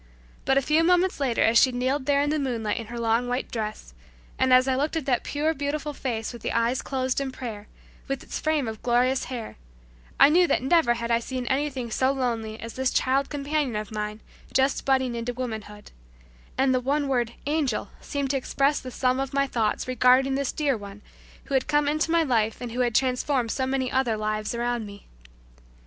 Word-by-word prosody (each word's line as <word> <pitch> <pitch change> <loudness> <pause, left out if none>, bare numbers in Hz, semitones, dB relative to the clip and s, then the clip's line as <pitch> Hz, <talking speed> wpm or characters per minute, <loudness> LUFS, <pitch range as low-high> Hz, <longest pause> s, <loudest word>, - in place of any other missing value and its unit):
But 270 +1 +3
a 275 - +3
few 310 +4 +3
moments 360 +1 +3
later 260 -5 +1
as 230 +1 +5
she 260 - +4
kneeled 260 +3 -1
there 285 0 +3
in 290 - 0
the 310 - 0
moonlight 230 -6 -1
in 225 - -7
her 235 +1 -6
long 230 +1 +1
white 250 +2 -1
night - - -25
dress, 215 - -5 0.5
and 260 0 +3
as 255 +1 +6
I 265 - +2
looked 295 +5 -1
at 320 -4 -2
that 250 -4 +1
pure 305 +2 0
beautiful 295 0 -3
face 235 -4 -3
with 240 - -10
the - - -3
eyes 235 +2 +1
closed 260 0 -1
in 270 -1 -3
prayer, 220 -5 -7 0.4
with 275 -1 -3
its - - -5
frame 310 -5 0
of 220 -1 -6
glorious 250 +2 +2
hair, 240 -4 -6 0.6
I - - +8
knew 350 +3 +5
that - - +1
never 270 -4 +3
had 235 0 -3
I 230 - +4
seen 255 +1 -4
anything 265 -2 -1
so 260 +4 +2
lovely 230 -5 -2
as 230 0 -7
this 260 0 0
child 270 +2 +1
companion 290 -3 -1
of 210 0 -4
mine 210 0 -4 0.3
just 265 +1 +1
budding 260 -2 +2
into 235 +1 -3
womanhood; 220 -4 -6 0.7
and 265 0 +3
the 255 - +2
one 280 +3 0
word 240 -3 0
"Angel" 285 -9 -1
seemed 280 -2 -2
to 275 - +1
express 275 +2 +1
the 255 - -8
sum 255 +1 0
of 270 +1 -3
my 275 0 +3
thoughts 230 -5 -1
regarding 255 +2 +4
this 275 0 -1
dear 290 -4 0
one 205 -1 -10 0.4
who - - -7
had 265 -1 +2
come 295 -1 +2
into 310 +3 +1
my 335 0 +3
life 225 -6 0
and 245 -2 -6
who 245 - -5
had 240 -3 +1
transformed 255 -1 +1
so 260 -1 -1
many 260 -1 -1
other 255 -4 +1
lives 215 +1 -2
around 240 -2 -2
me. 200 0 -12
255 Hz, 215 wpm, -25 LUFS, 235-275 Hz, 0.7 s, I